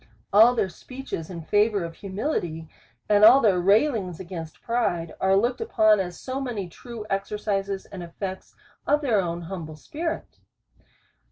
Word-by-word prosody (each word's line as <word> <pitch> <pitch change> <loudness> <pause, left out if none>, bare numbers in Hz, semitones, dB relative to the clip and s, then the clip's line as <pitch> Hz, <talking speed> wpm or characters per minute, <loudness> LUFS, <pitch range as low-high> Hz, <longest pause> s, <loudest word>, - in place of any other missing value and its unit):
All 225 +4 +7
their 200 - +1
speeches 250 -4 -7
in 170 -3 -7
favour 205 +2 +2
of 165 -1 -5
humility, 190 - -3 0.4
and 205 0 +4
all 240 +5 +9
their 205 -8 +3
railings 200 - +2
against 170 -4 -8
pride, 175 -9 -1
are 190 0 +4
looked 240 - 0
upon 215 - +4
as 180 -2 -4
so 265 +1 -4
many 230 -8 -3
true 230 +5 -9
exercises, 195 0 -2
and 190 - -9
effects 185 +2 -7 0.3
of 295 +1 +3
their 230 -8 +2
own 170 -1 -3
humble 165 -3 -7
spirit. 320 - -5
200 Hz, 150 wpm, -25 LUFS, 175-230 Hz, 0.4 s, all